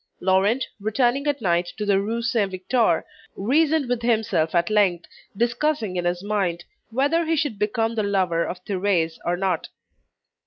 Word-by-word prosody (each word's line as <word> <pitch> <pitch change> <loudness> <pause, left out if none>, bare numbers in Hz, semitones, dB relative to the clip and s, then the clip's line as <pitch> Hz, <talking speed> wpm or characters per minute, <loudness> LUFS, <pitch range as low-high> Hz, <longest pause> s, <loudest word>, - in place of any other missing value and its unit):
Laurent, 195 +7 +2
returning 240 +6 +1
at 285 -3 0
night 175 -1 +1
to 210 - -3
the 200 -1 +3
Rue 230 +3 -2
Saint 230 -5 +1
Victor, 190 -1 +1 0.3
reasoned 290 +6 +2
with 245 -1 -1
himself 215 -9 +1
at 170 +3 +2
length, 190 -5 +2 0.3
discussing 235 -2 0
in 175 -1 -2
his 175 +1 -1
mind, 195 -5 -1 0.3
whether 285 +8 +1
he 325 0 0
should 285 -9 -1
become 225 +2 0
the 225 - 0
lover 185 -5 +1
of 180 0 -6
Thérèse, 185 -5 0
or 175 +1 0
not. 185 -3 -1
205 Hz, 160 wpm, -23 LUFS, 180-240 Hz, 0.3 s, the